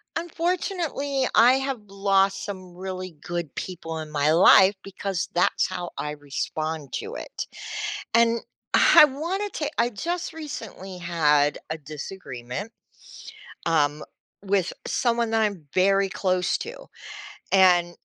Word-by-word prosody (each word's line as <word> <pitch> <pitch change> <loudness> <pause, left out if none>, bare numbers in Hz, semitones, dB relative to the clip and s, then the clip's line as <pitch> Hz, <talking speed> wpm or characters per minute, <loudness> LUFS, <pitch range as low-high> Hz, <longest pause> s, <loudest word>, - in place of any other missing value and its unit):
Unfortunately, 330 -5 -1
I 245 +3 +7
have 265 -2 -1
lost 195 0 +1
some 185 -3 -8
really 185 -2 -6
good 175 -4 -4
people 165 -3 -5
in 155 -1 -7
my 150 0 +2
life 190 +4 +7
because 195 -2 -3
that's 175 - +2
how 180 -2 -5
I 150 - -3
respond 150 +1 -4
to 440 +3 -4
it, - - -6 0.7
and 230 0 +4 0.3
I 300 - +8
wanted 345 +9 -3
to 295 -2 -2
I 235 - +3
just 335 - -3
recently 225 - -7
had 150 -4 +2
a 160 - -3
disagreement, 150 - -7 1.0
um, 150 -2 +1 0.4
with 195 -2 0
someone 235 -1 +1
that 225 0 +2
I'm 200 -6 -1
very 195 +1 +3
close 185 -2 0
to - - -8 0.7
and 180 -2 +5
190 Hz, 125 wpm, -25 LUFS, 165-235 Hz, 1.0 s, I